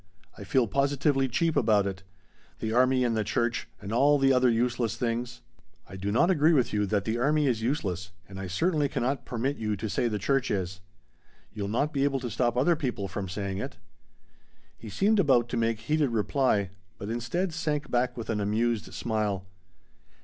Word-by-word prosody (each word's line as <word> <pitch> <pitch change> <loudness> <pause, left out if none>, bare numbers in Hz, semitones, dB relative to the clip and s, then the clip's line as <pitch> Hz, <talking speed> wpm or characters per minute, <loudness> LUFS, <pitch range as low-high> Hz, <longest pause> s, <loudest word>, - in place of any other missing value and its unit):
I - - -9
feel 130 -3 +2
positively 140 +3 +1
cheap 160 +6 0
about 105 -3 +3
it. 95 -1 -4 0.6
The 110 0 -3
army 130 +1 +3
and 120 -2 +1
the 110 - +1
church 120 +2 -1
and 100 +3 -6
all 145 +4 +4
the 135 -1 +4
other 125 0 +4
useless 120 -1 0
things 120 0 -3 0.2
" 75 +1 -38
"I 95 - -10
do 95 +2 -3
not 170 - +4
agree 160 -1 +4
with 130 -6 +2
you 105 -1 +1
that 100 0 0
the 115 +1 -1
army 150 +4 +2
is 120 -5 +1
useless 95 - -2 0.2
and 95 0 -9
I 95 - -4
certainly 150 - +1
cannot 135 0 -2
permit 130 +4 -2
you 105 -2 -1
to 110 +3 -4
say 120 - 0
the 105 -2 -1
church 130 +6 0
is." 90 -2 -2 0.7
"You'll 105 -2 -4
not 140 +9 0
be 140 -1 +1
able 140 -1 +1
to 120 -2 -4
stop 120 +1 0
other 165 +7 +4
people 125 -10 -3
from 95 0 -5
saying 95 0 -3
it!" - - -6 1.0
He 110 - -10
seemed 205 - +2
about 125 -8 +3
to - - -3
make 115 -1 0
heated 150 +3 +1
reply, 110 -3 +1 0.3
but 100 +3 -5
instead 140 +10 -2
sank 150 -3 -2
back 125 0 0
with 115 -1 -4
an 105 -2 -1
amused 110 +2 -1
smile. 105 -4 -1
120 Hz, 195 wpm, -28 LUFS, 105-135 Hz, 1.0 s, all